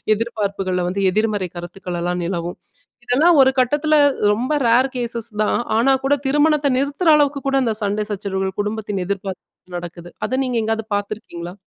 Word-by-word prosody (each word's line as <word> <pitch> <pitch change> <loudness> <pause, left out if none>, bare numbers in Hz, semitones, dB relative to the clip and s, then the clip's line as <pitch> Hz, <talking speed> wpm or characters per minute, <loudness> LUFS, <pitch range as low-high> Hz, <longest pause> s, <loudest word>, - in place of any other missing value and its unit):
எதிர்பார்ப்புகள்ல 200 -5 -2
வந்து 195 +2 -2
எதிர்மறை 210 -3 0
கருத்துக்கள்லாம் 175 0 -4
நிலவும். 175 -1 -4 0.5
இதெல்லாம் 305 +7 +4
ஒரு 265 0 +5
கட்டத்துல 295 +5 +2 0.4
ரொம்ப 245 +7 -1
ரேர் 245 +3 +4
கேஸஸ் 235 -2 -2
தான் 215 - +2 0.2
ஆனா 250 +4 +4
கூட 270 +1 +2
திருமணத்த 295 +1 +3
நிறுத்துற 285 +6 -1
அளவுக்கு 290 -1 +2
கூட 275 - +1
அந்த 225 -3 0
சண்ட 205 +1 -1
சச்சரவுகள் 190 -1 -3
குடும்பத்தின் 210 -2 -3
எதிர்பார்ப்பு 190 -2 -6
நடக்குது. 175 0 -9
அத 260 - -1
நீங்க 245 -2 -1
எங்காவது 225 0 -1
பாத்துருக்கீங்களா? 200 -4 -5
215 Hz, 145 wpm, -20 LUFS, 185-260 Hz, 0.5 s, ஒரு